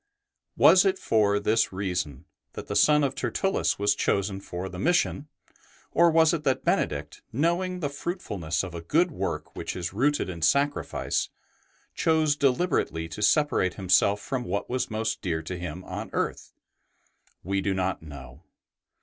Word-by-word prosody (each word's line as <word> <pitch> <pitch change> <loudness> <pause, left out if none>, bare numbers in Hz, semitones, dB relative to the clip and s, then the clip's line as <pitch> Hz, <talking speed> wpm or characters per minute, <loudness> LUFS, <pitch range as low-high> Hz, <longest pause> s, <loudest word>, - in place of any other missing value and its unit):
Was 185 - +7
it 190 -1 +2
for 105 - +2
this 110 +2 +1
reason 90 -8 -3 0.3
that - - -7
the - - -5
son 150 -1 +5
of 135 -1 0
Tertullus 195 +7 0
was 105 0 +2
chosen 100 -1 0
for 90 0 -5
the 90 -1 -8
mission, 170 - +1 0.6
or 170 0 +5
was 160 0 +4
it 160 -3 -2
that 135 -3 0
Benedict, - - -1
knowing 175 +6 0
the 145 - 0
fruitfulness 105 - -3
of 90 -3 -7
a 85 - -6
good 165 - +2
work 95 - -4
which - - -5
is 90 -1 -4
rooted 145 +8 +1
in 85 -3 -7
sacrifice, 140 - 0 0.6
chose 155 -2 +2
deliberately 135 - 0
to 105 - -7
separate 105 - +2
himself 95 +1 +3
from 125 +4 -3
what 100 +1 -3
was 130 0 -1
most 110 0 -2
dear 80 -5 -2
to 90 +3 -5
him 90 0 -6
on - - -6
earth? - - -2 0.9
We 95 +2 -1
do 95 0 -1
not 95 0 -1
know. 70 -2 -11
105 Hz, 160 wpm, -26 LUFS, 90-150 Hz, 0.9 s, Was